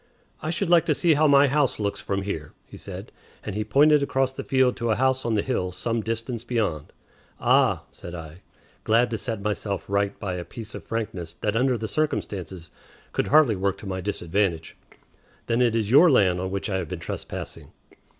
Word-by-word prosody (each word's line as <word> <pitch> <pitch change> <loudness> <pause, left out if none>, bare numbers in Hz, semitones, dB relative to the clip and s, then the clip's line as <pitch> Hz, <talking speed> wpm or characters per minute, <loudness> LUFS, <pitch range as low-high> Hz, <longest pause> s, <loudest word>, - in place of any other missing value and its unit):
"I 155 - -3
should 175 +4 0
like 170 -2 +5
to - - +3
see 170 -3 +3
how 155 +1 +4
my 140 0 +6
house 140 -1 +1
looks 100 -1 -2
from 100 0 -2
here," 80 -7 -5
he - - -13
said; - - -8 0.3
and - - -5
he 105 +2 -1
pointed 145 +7 +4
across 135 -1 +1
the 135 - -6
field 130 -2 +2
to 120 -1 -2
a 110 - +3
house 130 +1 +1
on 115 -2 +1
the 105 - +1
hill 95 -8 -1
some 115 +5 -2
distance 115 +1 -4
beyond. 105 -11 -2 0.5
"Ah," - - +3
said 85 - -9
I, 80 +1 -9 0.4
glad 115 +2 +3
to 115 - -2
set 110 -1 -4
myself 105 -1 -2
right 100 0 0
by 95 -3 -3
a 90 - -4
piece 105 +5 -8
of - - -7
frankness 95 -7 -4
that 105 0 0
under 125 +1 +2
the 110 0 -4
circumstances 95 - -3 0.4
could - - -1
hardly 150 -7 +5
work 95 0 -1
to - - -11
my 95 -1 -3
disadvantage; 90 -3 -1 0.7
"then 115 +1 +1
it 120 -2 +3
is 110 -2 0
your 155 +7 +8
land 95 - +4
on 95 - -2
which 100 0 -3
I 95 -3 -1
have 90 -3 -3
been - - -4
trespassing." - - -6
110 Hz, 205 wpm, -25 LUFS, 95-130 Hz, 0.7 s, your